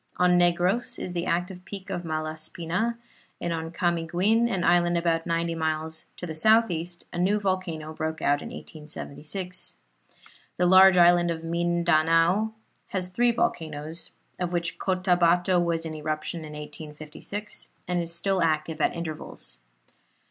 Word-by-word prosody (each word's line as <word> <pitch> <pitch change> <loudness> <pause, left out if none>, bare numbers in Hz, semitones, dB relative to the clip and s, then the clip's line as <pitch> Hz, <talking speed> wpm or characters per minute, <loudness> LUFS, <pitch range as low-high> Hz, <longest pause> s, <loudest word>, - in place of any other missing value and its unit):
On 180 0 +4
Negros 175 +6 +2
is 180 - -4
the 170 -1 -2
active 180 +2 -1
peak 195 0 -8
of 180 -2 -2
Malaspina, 160 +7 -2 0.4
and 170 - -2
on 160 0 -3
Camiguin, 175 +7 +1
an 190 -6 -1
island 175 0 +4
about 165 -1 0
ninety 170 0 0
miles 160 0 -2
to - - -5
the 160 - -5
southeast, 175 -2 +2
a 175 - -3
new 200 +4 +3
volcano 185 -6 -2
broke 160 0 -3
out 145 0 +2
in - - -7
1876. 155 +4 -6 0.8
The 180 - +3
large 190 +1 +8
island 175 0 +6
of 165 -1 -3
Mindanao 170 +3 +2 0.4
has 185 -2 -2
three 240 +6 +3
volcanoes, 160 -6 -2 0.3
of 180 -1 -1
which 170 -1 -2
Cottabato 180 -1 +3
was 165 -1 -1
in 160 - -4
eruption 155 +2 -3
in 155 -1 -8
1856 150 +7 -7 0.2
and 175 -1 0
is 170 0 -4
still 185 +2 +1
active 155 0 0
at - - +2
intervals. 160 - -6
170 Hz, 140 wpm, -26 LUFS, 160-180 Hz, 0.8 s, large